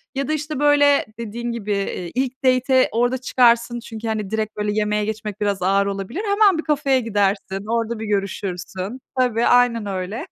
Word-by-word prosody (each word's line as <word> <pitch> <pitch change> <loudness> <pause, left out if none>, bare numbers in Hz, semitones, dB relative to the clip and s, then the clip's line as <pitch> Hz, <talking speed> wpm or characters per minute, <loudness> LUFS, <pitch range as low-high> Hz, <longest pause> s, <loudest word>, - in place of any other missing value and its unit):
Ya 275 -1 -1
da, 310 - 0
işte, 305 -2 -3
böyle, 290 -1 +4
dediğin 235 +1 -4
gibi, 220 -3 -4
eee, 195 -3 -2
ilk 260 +1 -2
date'e 255 0 +3
orada 245 +3 +1
çıkarsın 240 -2 +2
çünkü, 225 -1 -7
hani, 215 -3 -2
direkt 220 0 -3
böyle 210 0 -1
yemeğe 210 0 0
geçmek 215 -1 -5
biraz 200 -2 0
ağır 195 +2 +2
olabilir, 200 - -4
hemen 405 -3 +4
bir 320 - -3
kafeye 280 -3 +1
gidersin, 200 -3 -1
orada 230 0 -1
bir 220 - -4
görüşürsün. 195 +1 -3 0.2
Tabii, 240 -2 +2
aynen 245 -3 +3
öyle. 200 - -4
230 Hz, 175 wpm, -21 LUFS, 205-255 Hz, 0.2 s, böyle